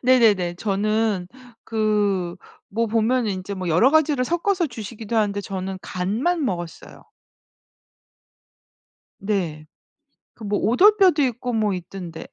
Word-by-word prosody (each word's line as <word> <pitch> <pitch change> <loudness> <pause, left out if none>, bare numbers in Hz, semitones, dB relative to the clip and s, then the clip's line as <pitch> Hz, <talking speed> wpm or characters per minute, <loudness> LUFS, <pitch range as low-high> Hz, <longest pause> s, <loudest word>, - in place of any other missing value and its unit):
네네네. 220 -9 +4
저는 205 0 0 0.4
그 205 -5 0 0.3
뭐 230 +3 -1
보면은 225 +1 +1
인제 190 +1 -4
뭐 185 -2 -4
여러 175 +11 +4
가지를 300 -4 +3
섞어서 345 +4 0
주시기도 225 -2 -6
하는데 205 -2 +1
저는 190 -1 -5
간만 240 - -1
먹었어요. 175 -6 -5 2.2
네. 175 -7 -2 0.7
그 225 - -12
뭐 205 0 0
오돌뼈도 370 - +5
있고 245 -1 -2
뭐 215 -3 +1
있던데. 180 -2 -7
215 Hz, 240 characters per minute, -23 LUFS, 190-245 Hz, 2.2 s, 오돌뼈도